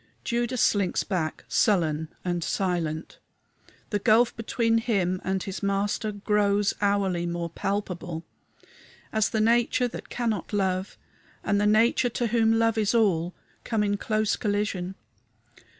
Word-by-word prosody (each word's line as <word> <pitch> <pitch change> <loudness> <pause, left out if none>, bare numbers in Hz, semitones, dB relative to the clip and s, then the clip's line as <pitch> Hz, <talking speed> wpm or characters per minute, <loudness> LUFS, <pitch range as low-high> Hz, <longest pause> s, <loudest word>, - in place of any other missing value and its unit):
Judas 240 0 -1
slinks 200 -3 +2
back, 170 -5 -3
sullen 160 -6 +2 0.2
and 175 -1 -1
silent. 170 -4 -2 0.7
The 205 - +1
gulf 230 +4 +4
between 230 0 +1
him 190 -6 0
and 190 0 -1
his 195 0 -5
Master 205 +2 0
grows 205 0 +1
hourly 195 -4 +1
more 170 -1 -3
palpable 175 -4 -3 0.9
as 220 -1 +2
the 220 - -1
nature 235 +2 +3
that 240 - -9
cannot 220 -6 -2
love 190 -1 -1 0.5
and 205 0 +1
the 210 - +3
nature 230 +3 +3
to 240 +1 -2
whom 225 -1 +4
love 225 -1 +2
is 210 +2 +1
all 180 -6 +2 0.3
come 220 -2 0
in 205 0 +1
close 215 0 0
collision. 205 -4 -2
205 Hz, 135 wpm, -26 LUFS, 185-220 Hz, 0.9 s, gulf